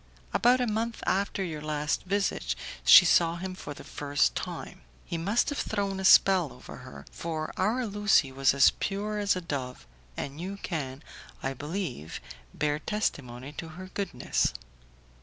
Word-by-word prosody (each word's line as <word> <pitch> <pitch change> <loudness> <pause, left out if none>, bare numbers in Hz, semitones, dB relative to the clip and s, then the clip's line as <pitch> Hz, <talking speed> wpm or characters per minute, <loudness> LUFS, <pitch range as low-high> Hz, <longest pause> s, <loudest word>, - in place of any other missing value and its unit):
"About 250 +1 +4
a 250 - +2
month 225 +1 -2
after 195 +1 0
your 160 -4 -5
last 150 +1 -2
visit 185 - 0 0.3
she - - +10
saw 170 -1 +4
him 185 +2 -5
for 145 -5 -8
the - - -10
first 145 0 0
time. - - -6 0.2
He - - -5
must 195 +8 +1
have 290 - -3
thrown 200 -2 -2
a 190 - -3
spell 185 -6 +6
over - - -11
her, 70 0 -11
for 160 -2 -4
our 230 +6 +1
Lucie 205 -9 +2
was 135 +1 +2
as 140 - +7
pure 210 +1 -3
as 200 -2 +2
a 185 - -3
dove, 135 - -5 0.3
and 145 +3 -5
you 195 +3 -5
can, 145 -7 -4 0.4
I 135 - -1
believe, 145 - -5 0.3
bear 150 0 -1
testimony 140 - -3
to 165 +2 -7
her 185 0 -8
goodness." 125 - -1
170 Hz, 160 wpm, -28 LUFS, 145-200 Hz, 0.4 s, she